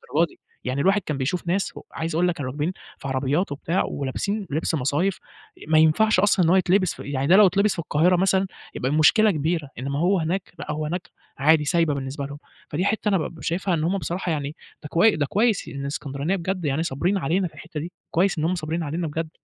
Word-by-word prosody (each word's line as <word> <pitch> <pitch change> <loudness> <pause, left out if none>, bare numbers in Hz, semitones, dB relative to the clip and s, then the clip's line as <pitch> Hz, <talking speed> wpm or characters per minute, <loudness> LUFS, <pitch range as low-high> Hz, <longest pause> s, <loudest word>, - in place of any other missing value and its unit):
للدرجة 170 +2 +4
دي - - -20 0.2
يعني، 130 +2 -1
الواحد 195 +4 +3
كان 150 -5 -3
بيشوف 160 +7 -2
ناس 190 +3 -1
و - - -7
عايز 160 0 -3
أقول 180 +2 +3
لك 175 - 0
كانوا 130 -4 -4
راكبين 150 +5 -1 0.3
في - - -7
عربيات 135 +6 0
وبتاع 165 +5 -1
ولابسين 195 +9 -3
لِبس 155 +3 -1
مصايف 150 +7 0 0.5
ما 155 - +4
ينفعش 185 +7 +4
أصلًا 195 -2 +4
إن - - +3
هو 180 - +5
يتلِبس 185 0 +3
ف - - -20
يعني 140 -1 -2
ده 180 - +6
لو 210 0 +8
يتلِبس 200 +3 +3
في - - -7
القاهرة 170 +3 +3
مثلًا 190 +1 +2 0.3
يبقى 130 - -1
المشكلة 180 +8 +5
كبيرة، 155 -1 -1
إنما 140 +2 -2
هو 185 +3 +3
هناك، 180 +4 -2
لأ - - -4
هو 155 0 -2
هناك 175 +4 -4 0.3
عادي 150 +2 +4
سايبة 165 -2 +2
بالنسبة 140 +1 -4
لهم، 145 +1 -7 0.3
فدي 170 +6 -1
حِتّة 215 0 +1
أنا 195 - +3
بابقى 160 -1 -5
شايفها 180 +2 0
إن 155 - 0
هُم 180 +5 +1
بصراحة 175 +1 -3
يعني 145 -1 -3 0.3
ده 150 - -7
كوي 210 +8 +4
ده 145 - 0
كويس 215 - +1
إن 140 - -6
الإسكندرانية 140 +4 -2
بجد 185 -1 -3
يعني 145 +3 0
صابرين 170 +6 0
علينا 180 +3 0
في - - -15
الحِتّة 160 -2 -7
دي، 170 +4 -6 0.2
كويس 180 +1 +2
إن 155 - -1
هُم 180 - +1
صابرين 165 0 -3
علينا 160 +3 -2
بجد، 160 +1 -3
165 Hz, 230 wpm, -24 LUFS, 145-185 Hz, 0.5 s, لو